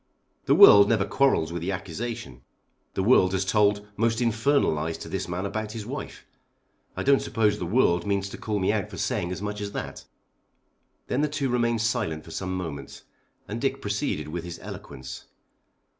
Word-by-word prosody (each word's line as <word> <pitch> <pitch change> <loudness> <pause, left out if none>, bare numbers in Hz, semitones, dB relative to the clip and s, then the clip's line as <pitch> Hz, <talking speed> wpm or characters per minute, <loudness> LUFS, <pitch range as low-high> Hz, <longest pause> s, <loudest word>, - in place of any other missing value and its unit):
The - - +4
world 100 0 +9
never 110 -4 +2
quarrels 105 -14 +2
with 85 - -4
the 90 +3 -2
accusation. 90 - -5 0.5
The 95 - 0
world 95 -4 +4
has 95 0 0
told 105 +1 +2
most 115 +1 +1
infernal 120 +4 +2
lies 80 +2 -3
to - - -8
this - - -3
man 90 +2 -3
about 110 +1 -4
his 110 -3 -6
wife. - - -7 0.7
I - - -2
don't 140 0 +4
suppose 105 -2 +1
the 90 - -3
world 90 -4 +2
means 100 -1 0
to - - -8
call 105 -2 -2
me 95 +1 +1
out 105 -1 -2
for 95 - -9
saying 105 -3 -1
as 90 - -5
much 105 0 -4
as 100 0 -5
that." - - -6 1.0
Then 130 - -1
the 150 - +2
two 140 -2 -1
remained 120 -2 +1
silent 105 -9 -1
for 80 - -11
some 95 +2 -3
moments 80 -6 -7 0.4
and 110 +3 -5
Dick 135 0 0
proceeded 100 - -2
with 85 +1 -4
his 85 -1 -7
eloquence. 65 0 -9
105 Hz, 190 wpm, -26 LUFS, 90-115 Hz, 1.0 s, world